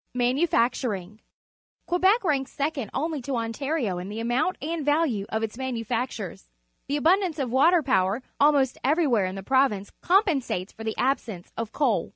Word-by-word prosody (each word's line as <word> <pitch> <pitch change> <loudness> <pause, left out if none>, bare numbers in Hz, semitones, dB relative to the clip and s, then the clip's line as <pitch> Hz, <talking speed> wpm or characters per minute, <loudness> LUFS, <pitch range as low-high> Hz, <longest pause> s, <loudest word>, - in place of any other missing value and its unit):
Manufacturing. 245 - 0 0.3
— - - -56
Quebec 380 +6 +3
ranks 280 -6 0
secon 285 -3 -1
d - - -14
only 305 +1 -2
to 265 +2 -3
Ontario 230 - -2
in 180 +2 -6
the 215 +2 -5
amount 240 +10 0
and 320 +1 -3
value 290 -9 +1
of 220 0 -2
its 225 +3 -4
manufactures. 230 - -4 0.4
The 285 - 0
abundance 345 +2 +2
of 265 -5 -2
water 320 +6 +4
power 225 -3 +1 0.2
almost 280 -3 +3
everywhere 270 - +2
in 185 - -5
the 195 - -6
province 260 -6 +1
compensates 305 - +1
for 225 - -9
the 220 0 -3
absence 230 -8 -1
of 230 -1 -4
coal. 255 - +1
260 Hz, 165 wpm, -26 LUFS, 220-300 Hz, 0.4 s, water